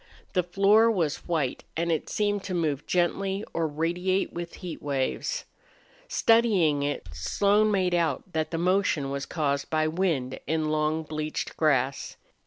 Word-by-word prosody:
The 180 - +3
floor 200 +6 +4
was 170 -9 -1
white, 155 -7 -1
and 170 +1 0
it 160 - -1
seemed 205 -1 0
to 185 - -3
move 150 -5 -1
gently 190 +3 0
or 165 -1 0
radiate 175 +5 -1
with 170 0 -6
heat 175 -4 -7
waves. 140 - -2 0.6
Studying 205 - +3
it, 145 -9 -2
Slone 200 - +2
made 185 -3 +1
out 165 -6 +1
that 155 -1 -1
the 165 - -3
motion 175 -5 +1
was 140 -1 -3
caused 140 -4 -1
by 155 0 +1
wind 155 -7 -1
in 155 -1 0
long 155 +1 0
bleached 155 0 -4
grass. 140 -3 +1
165 Hz, 150 wpm, -27 LUFS, 150-190 Hz, 0.6 s, floor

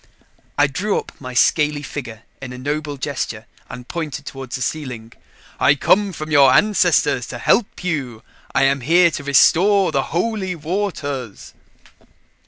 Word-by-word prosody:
I 145 - +5
drew 180 +9 -1
up - - -5
my 125 -2 -8
scaly 150 +2 +2
figure 120 -7 -7 0.2
in 130 -1 -7
a - - -8
noble 145 +2 -4
gesture 130 -6 -4 0.2
and 125 0 -9
pointed 155 -3 -5
toward 135 -3 -8
the 130 - -3
ceiling. 125 -4 -5 0.5
"I 140 - +4
come 200 +7 +2
from 155 -3 -7
your 140 -3 +6
ancestors 210 +8 +2
to - - -7
help 220 -5 +1
you. 135 -10 -3 0.3
I - - +4
am 135 0 +2
here 170 +6 +4
to 145 - -5
restore 185 +8 +4
the 135 -1 0
Holy 190 +1 -2
Waters." 155 - -4
145 Hz, 150 wpm, -20 LUFS, 130-170 Hz, 0.5 s, your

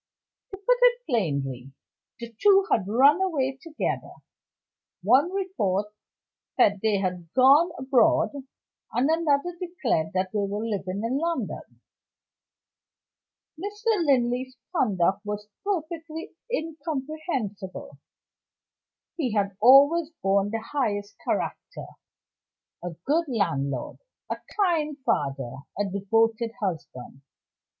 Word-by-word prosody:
To 390 - -8
put - - +2
it - - +4
plainly, 140 - -2 0.5
the 235 -1 -8
two 395 -1 +6
had 195 -4 +2
run 275 - +5
away 270 -8 0
together; 330 -3 -3 0.9
one 260 - +4
report 210 - -1 0.6
said 205 -1 +4
they 215 -2 +2
had 180 -3 -3
gone 275 +7 +6
abroad, 280 +5 +3 0.6
and 250 +3 +2
another 325 +1 +1
declared 270 - -1
that 185 0 -1
they 210 - -1
were 205 +2 -2
living 200 -2 -3
in 250 +4 0
London. 335 +1 -4 1.8
Mr. 415 +1 -1
Linley's 255 -1 +1 0.2
conduct 195 - +1
was 210 0 -5 0.2
perfectly 330 -4 -4 0.2
incomprehensible. 300 - -4 1.2
He 260 -9 -1
had 200 -2 0
always 285 +7 +7
borne 195 +1 +2
the 225 +1 -3
highest 205 -7 -1
character - - -3 1.0
a 175 - -3 0.2
good 325 +4 +2
landlord, 140 - -2 0.3
a - - -1 0.2
kind 315 -7 +1
father, 135 - -1 0.2
a 205 - +1
devoted 225 +4 +1
husband. 155 - -5
245 Hz, 105 wpm, -26 LUFS, 200-320 Hz, 1.8 s, always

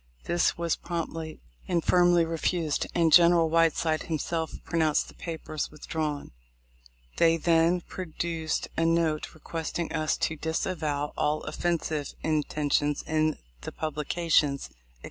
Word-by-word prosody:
This 175 -1 +1
was 170 -1 0
promptly 165 -2 -5 0.3
and 170 -2 +1
firmly 175 -1 +4
refused, 165 -1 -1
and 165 -2 +3
general 170 -2 +6
Whiteside 165 -1 +2
himself 160 0 -2
pronounced 160 -3 +1
the - - -13
papers 160 -2 -5
withdrawn. 150 -1 -4 0.9
They 165 0 +4
then 165 +2 +3
produced 165 -2 -3
a 165 - +1
note 165 -2 +1
requesting 165 +1 -4
us 155 -1 0
to 160 - -1
"disavow" 155 -2 -2
all 150 +1 0
offensive 155 -2 -2
intentions 150 -1 0
in 155 -1 +1 0.2
the - - -6
publications, 155 -2 0
etc. - - -29
160 Hz, 120 wpm, -28 LUFS, 155-170 Hz, 0.9 s, general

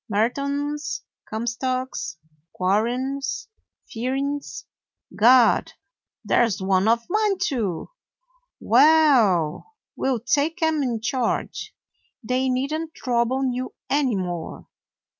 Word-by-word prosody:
Merton's, 280 +7 -1 0.3
Comstock's, 235 -6 -3 0.4
Quarren's, 260 - -1 0.4
Fearings' 275 +4 -3 0.2
— - - -23
Gad! 240 +1 +5 0.5
there - - +3
's 195 - -3
one 190 +1 +2
of 230 +1 +2
mine, 420 0 +1
too. 235 - -2 0.7
Well, 280 - +4 0.2
we - - -1
'll 255 -3 0
take 290 - 0
'em 320 -2 +2
in 240 -5 -1
charge. 235 +1 -2 0.5
They 255 +3 0
need 260 +4 -1
n't 320 0 -4
trouble 250 +1 0
you 255 +1 -5 0.2
any 275 -5 +2
more. 175 -3 -5
255 Hz, 105 wpm, -23 LUFS, 225-285 Hz, 0.7 s, Gad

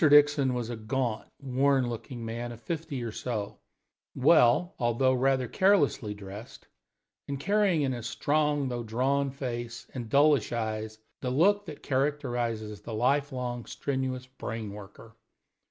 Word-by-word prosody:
Dixon 145 -3 +5
was 120 -1 -3
a - - -3
gaunt, 115 0 -2
worn 135 -1 +2
looking 120 0 -6
man 120 +1 -4
of 115 - -9
fifty 145 0 -4
or 115 - -3
so, 110 -3 -4 0.6
well, 135 +4 +5
although 125 +2 +2
rather 130 0 +2
carelessly, 145 - +2
dressed, 100 +3 -10 0.6
and 140 -1 -3
carrying 195 -2 +2
in 135 - +1
his 120 -2 -4
strong, 145 0 +1
though 120 -1 -3
drawn, 130 +5 0
face 120 -3 -5
and 120 -4 -5
dullish 145 -2 +4
eyes 110 -2 -3 0.2
the 125 - -2
look 200 +9 +3
that 150 - -9
characterizes 120 -7 -1
the 110 +1 -6
life 140 +5 +2
long 125 -2 -4
strenuous 130 -2 -2
brain 115 -5 -6
worker. 105 +2 -12
125 Hz, 140 wpm, -29 LUFS, 115-140 Hz, 0.6 s, Dixon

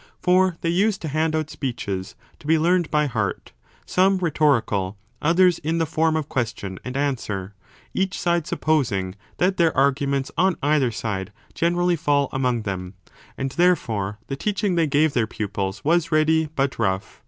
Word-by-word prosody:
For 185 -1 +3
they 165 - 0
used 195 +3 +2
to 160 - -2
hand 155 +2 0
out 155 -1 -2
speeches 100 -8 -4 0.2
to 150 - -12
be 160 +1 +4
learned 175 +1 +2
by 150 -1 +2
heart, 115 -8 -3 0.3
some 190 +1 +3
rhetorical, 135 - +1 0.2
others 175 +2 +4
in 160 +3 -1
the 165 - +1
form 160 +1 +1
of 155 -2 -1
question 100 -8 -3
and 125 +1 -5
answer, 105 -9 -2 0.4
each 190 -1 -1
side 170 -2 0
supposing 120 -12 0 0.2
that 185 +2 +1
their 165 -4 +2
arguments 140 0 +1
on 185 0 +3
either 145 -3 +3
side 105 -3 -4 0.2
generally 175 +1 +1
fall 145 -3 +1
among 125 -3 0
them. 95 -2 -5 0.4
And 135 0 -2
i84 - - -12
a - - -17
therefore 110 - +1
the 135 - -4
teaching 205 +4 -1
they 165 -2 +2
gave 145 +1 +2
their 115 -3 +1
pupils 100 -2 -4
was 170 +1 +2
ready 160 +1 +3
but 135 -2 -1
rough. 95 -4 -1
145 Hz, 170 wpm, -23 LUFS, 115-170 Hz, 0.4 s, be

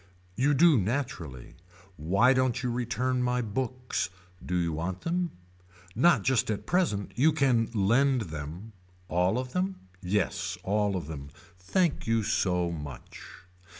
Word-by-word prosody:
You 140 +3 +2
do 160 -3 +6
naturally. 100 - -3 0.4
Why 100 - +3
don't 130 -1 +1
you 125 - 0
return 125 +1 -1
my 125 0 +1
books. 125 +2 -2 0.3
Do 90 - -3
you 85 -2 0
want 90 +4 -3
them. 175 +1 -1 0.6
Not 170 - +4
just 130 -3 +2
at 105 -2 -2
present. 165 - 0
You 150 +6 +4
can 130 -7 +2
lend 120 +6 +3
them. 80 +9 -7 0.4
All 90 +6 +2
of 125 0 -4
them. 185 +1 0 0.3
Yes 95 -1 -1
all 105 0 +1
of 90 -5 -3
them. 70 -3 -7 0.3
Thank 155 - 0
you 115 -1 +2
so 90 -3 +1
much. 75 -5 -8
115 Hz, 140 wpm, -28 LUFS, 90-130 Hz, 0.6 s, do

